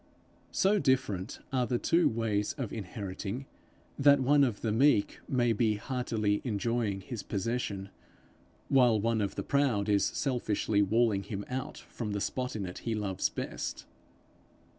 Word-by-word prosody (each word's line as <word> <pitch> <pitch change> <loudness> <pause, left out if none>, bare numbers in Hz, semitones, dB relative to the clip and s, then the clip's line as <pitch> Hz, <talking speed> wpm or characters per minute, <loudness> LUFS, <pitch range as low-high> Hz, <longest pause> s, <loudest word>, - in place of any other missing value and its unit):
So 200 +2 +3
different 125 -9 0
are 125 -2 +1
the 125 - +1
two 170 +7 +3
ways 110 -3 -1
of 130 -8 -5
inheriting, 100 +3 -5 0.5
that 140 0 +6
one 140 +2 +4
of 120 -6 0
the 110 - 0
meek 115 -2 +3
may 120 -3 +2
be 110 0 +2
heartily 110 -2 -1
enjoying 110 -3 -1
his 115 +2 -6
possession, 100 -2 -3 0.8
while 125 -5 +4
one 115 +1 +1
of 100 - -2
the - - -3
proud 130 -8 +1
is 100 -1 +3
selfishly 110 -5 0
walling 105 0 +2
him 100 +1 -5
out 130 +4 -4
from 105 -4 -6
the 100 - -1
spot 125 +4 -2
in 100 -3 -3
it 90 - -7
he 115 -1 -2
loves 100 -3 -1
best. - - -5
115 Hz, 150 wpm, -30 LUFS, 100-130 Hz, 0.8 s, that